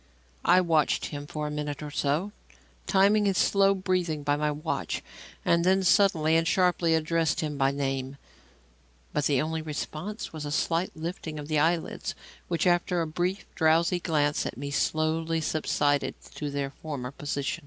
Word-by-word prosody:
I 180 +1 +6
watched 160 -4 +2
him 145 0 -6
for 150 0 -4
a 150 - -3
minute 150 0 -4
or 150 - -6
so, 150 +8 0 0.6
timing 205 +2 +4
his 195 -2 +1
slow 195 0 +4
breathing 180 -5 -1
by 145 0 +2
my 150 +1 0
watch, 150 +2 -3 0.4
and 170 0 +3
then 190 +2 +3
suddenly 170 -5 +4
and 165 0 +2
sharply 175 -2 +3
addressed 160 0 +1
him 150 -2 -3
by 135 -1 +2
name; 135 -1 -2 1.0
but 150 - 0
the 140 -3 +3
only 160 +2 -1
response 155 +7 -5
was 155 -2 -5
a 145 - -4
slight 165 +4 0
lifting 160 -1 -5
of 145 -1 -6
the 155 -1 +2
eyelids, 165 +2 0 0.3
which, 170 -2 0
after 175 0 +2
a - - 0
brief, 175 +5 -2
drowsy 165 +2 +3
glance 150 -4 +1
at - - -7
me, 140 +2 -5
slowly 160 +3 0
subsided 145 -2 0 0.2
to 150 - -4
their 140 -1 -3
former 140 -5 -6
position. 140 -1 -3
155 Hz, 165 wpm, -27 LUFS, 145-175 Hz, 1.0 s, I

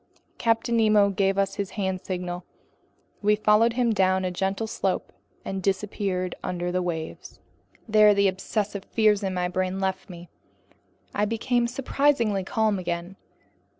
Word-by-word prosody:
Captain 230 0 +1
Nemo 215 -2 +4
gave 195 0 +1
us 195 +1 0
a 200 -2 -3
hand 190 -3 -2
signal. 180 -1 -4 0.8
We 210 0 +4
followed 215 +2 +3
him 240 -2 +1
down 190 -2 +2
a 180 - -1
gentle 195 +4 -1
slope 195 -3 -2 0.3
and 195 0 -3
disappeared 190 -2 -1
under 175 0 -2
the 185 0 0
waves. 165 -3 -5 0.5
There 215 -1 +6
the 200 0 +4
obsessive 200 +1 -2
fears 215 -2 +2
in 190 -2 -2
my 180 0 0
brain 185 +1 -2
left 190 +1 -2
me. 175 -1 -10 0.9
I 205 - +1
became 235 +2 0
surprisingly 250 -5 +1
calm 215 0 0
again. 175 +1 -4
195 Hz, 145 wpm, -25 LUFS, 185-215 Hz, 0.9 s, There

